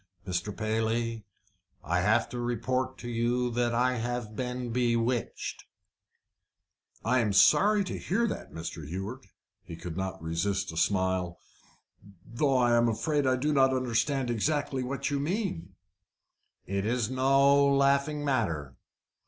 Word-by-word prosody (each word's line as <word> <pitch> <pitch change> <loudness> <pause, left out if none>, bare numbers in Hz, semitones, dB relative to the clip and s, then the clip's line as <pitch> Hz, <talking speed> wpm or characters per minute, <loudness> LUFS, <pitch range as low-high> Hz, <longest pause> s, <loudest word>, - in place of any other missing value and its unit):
"Mr. 90 +2 -3
Paley, 110 0 -1 0.6
I 85 +5 0
have 105 +5 +2
to 125 - -5
report 130 +2 -1
to 120 - -8
you 120 +1 0
that 120 0 0
I 125 +1 +2
have 120 -2 -3
been 125 -1 -3
bewitched." 120 0 -1 1.4
"I 125 +3 +3
am 110 -4 +1
sorry 205 - +5
to 185 - -5
hear 220 +7 0
that, 215 - -5
Mr. 80 -1 -6
Hewett." 95 - -6 0.4
He 85 - -8
could 85 0 -7
not 95 0 -3
resist 95 +4 -2
a - - -10
smile. 95 -1 0 0.9
"Though 130 +4 +1
I 120 -1 +3
am 120 0 +4
afraid 145 +5 0
I 130 - +3
do 145 +4 0
not 135 -1 +4
understand 130 +1 0
exactly 135 +3 0
what 135 +3 -3
you 140 - 0
mean." 140 - -3 0.9
"It 100 +1 -2
is 120 +1 0
no 135 +2 +4
laughing 140 +1 +2
matter." 85 - -1
120 Hz, 135 wpm, -29 LUFS, 105-135 Hz, 1.4 s, sorry